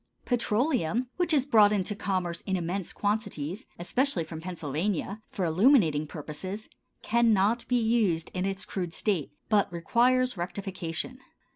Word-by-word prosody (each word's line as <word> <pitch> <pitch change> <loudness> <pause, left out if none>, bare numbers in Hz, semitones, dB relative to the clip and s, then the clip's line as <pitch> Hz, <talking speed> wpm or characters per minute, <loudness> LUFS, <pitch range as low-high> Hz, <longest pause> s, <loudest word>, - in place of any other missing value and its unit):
Petroleum, 245 - +1
which 350 -1 +1
is 280 -4 +3
brought 215 -7 +6
into 205 0 0
commerce 185 -4 -2
in 190 -1 +1
immense 175 +2 -2
quantities, 205 - -2
especially 195 - 0
from 160 0 -8
Pennsylvania, 180 +4 -2
for 185 - -2
illuminating 165 - +4
purposes, 165 +8 -6 0.4
cannot 230 -1 +3
be 250 -1 +2
used 220 -8 +1
in 185 - -1
its 195 0 -4
crude 180 -3 -4
state, 190 -9 0 0.2
but 210 -4 +2
requires 245 +8 +2
rectification. 185 +4 -4
195 Hz, 130 wpm, -28 LUFS, 170-235 Hz, 0.4 s, brought